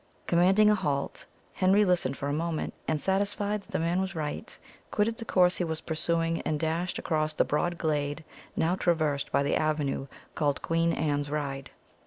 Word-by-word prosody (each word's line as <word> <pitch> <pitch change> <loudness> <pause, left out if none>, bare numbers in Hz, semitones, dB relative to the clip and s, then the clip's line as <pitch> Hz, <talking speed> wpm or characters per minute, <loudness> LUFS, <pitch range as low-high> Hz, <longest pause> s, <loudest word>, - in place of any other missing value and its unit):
Commanding 190 +5 +4
a 210 - +6
halt, 140 -8 -2 0.3
Henry 195 +3 +4
listened 175 -8 +1
for 140 - -3
a 145 - -1
moment, 160 +1 -2
and, 155 - 0
satisfied 205 +3 +1
that - - -25
the - - -1
man 170 +3 +1
was 190 -2 -3
right, 150 -2 -4 0.3
quitted 225 +2 0
the 230 - -6
course 180 -3 +3
he - - 0
was 160 -2 -2
pursuing, 165 +1 0
and 150 - -1
dashed 165 +3 -1
across 155 -1 0
the - - +2
broad 175 +4 0
glade 150 -1 -1 0.3
now 165 +2 +2
traversed 155 -6 0
by 140 - +2
the 140 - +1
avenue 150 -3 0 0.3
called 145 -2 0
Queen 165 0 +1
Anne's 145 -3 -1
Ride. 140 -2 -3
165 Hz, 180 wpm, -28 LUFS, 150-180 Hz, 0.3 s, a